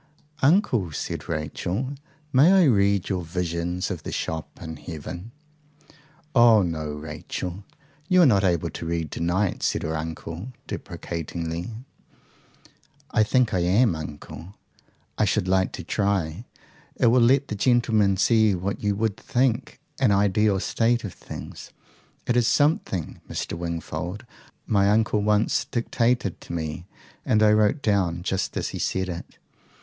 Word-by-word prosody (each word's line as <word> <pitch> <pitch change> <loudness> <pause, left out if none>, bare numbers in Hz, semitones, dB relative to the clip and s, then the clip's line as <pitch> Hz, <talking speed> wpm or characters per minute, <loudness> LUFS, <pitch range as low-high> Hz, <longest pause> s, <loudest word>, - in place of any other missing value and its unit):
"Uncle," 135 - +3
said - - -5
Rachel, 90 - -3 0.4
"may 140 +7 +6
I 190 -1 +6
read 100 - +3
your 95 -3 -1
visions 85 +1 -2
of - - -4
the - - -6
shops 80 -1 -4
in 80 -1 -7
heaven?" 85 +6 -7 1.0
"Oh 115 -4 +6
no, 80 -3 -3
Rachel. 80 +5 -6 0.5
You 180 -1 +6
are - - +7
not 105 -7 +4
able 85 -4 +1
to - - -6
read 85 -3 -2
to - - -5
night," 90 +3 0
said - - 0
her 80 +1 -2
uncle 80 +7 -6
deprecatingly. 85 +2 -5 1.4
"I - - +3
think 120 +1 +2
I 95 - +2
am, 95 +3 +3
uncle. 80 +4 -8 0.6
I - - +4
should 90 - 0
like 95 0 +2
to - - -6
try. 100 -1 -1 0.5
It - - +1
will 120 +2 +5
let 135 +4 +4
the 105 - -2
gentlemen 110 -4 +3
see 110 -1 +4
what 95 +3 -3
you 105 -1 +1
WOULD 110 0 -1
think 125 +1 0 0.2
an 130 -6 +4
ideal 100 0 +3
state 115 +4 +1
of 100 - -5
things. - - -9 0.6
It 120 - +1
is 120 -2 +3
something, 145 - +1
Mr. - - -4
Wingfold, 85 +3 -5 0.4
my 100 -3 +3
uncle 105 0 +2
once 105 +1 +2
dictated 120 -4 0
to - - -8
me, 80 +1 -4 0.4
and 110 0 +3
I 105 - +6
wrote 105 +7 +2
down 90 -5 +1
just 95 0 -2
as - - -1
he - - -6
said 95 0 -1
it. 85 -1 -7
100 Hz, 145 wpm, -25 LUFS, 85-115 Hz, 1.4 s, are